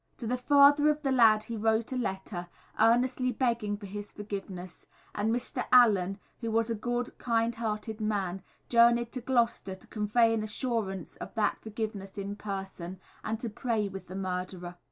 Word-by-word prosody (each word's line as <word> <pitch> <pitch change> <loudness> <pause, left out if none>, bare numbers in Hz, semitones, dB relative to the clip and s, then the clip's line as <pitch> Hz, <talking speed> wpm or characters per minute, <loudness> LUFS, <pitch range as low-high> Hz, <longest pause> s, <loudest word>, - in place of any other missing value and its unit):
To 235 - -6
the 245 +3 0
father 285 +3 +6
of 300 +1 0
the 270 - +1
lad 220 -4 +5
he 230 - -5
wrote 220 +2 +1
a - - -2
letter, 190 -6 -3 0.3
earnestly 250 +3 +3
begging 230 -4 0
for 205 - -10
his 205 +1 -7
forgiveness; 195 -3 -7 0.3
and 210 +2 0
Mr. 245 +1 -2
Allen, 200 -7 +5 0.2
who 230 - -3
was 225 +1 +1
a - - +2
good, 240 +3 -2
kind 230 -1 +1
hearted 220 -1 -3
man, 195 -3 -1 0.3
journeyed 235 0 +4
to 255 - -4
Gloucester 235 -6 +1
to 190 - -18
convey 225 +2 +2
an 225 - 0
assurance 215 -4 -2
of - - -8
that 215 -2 +1
forgiveness 215 -2 -5
in 200 0 -4
person, 190 -3 -6 0.2
and 220 0 -2
to 240 - -2
pray 220 -2 -1
with 195 0 -8
the 185 - -8
murderer. 180 -2 -4
220 Hz, 175 wpm, -30 LUFS, 195-235 Hz, 0.3 s, father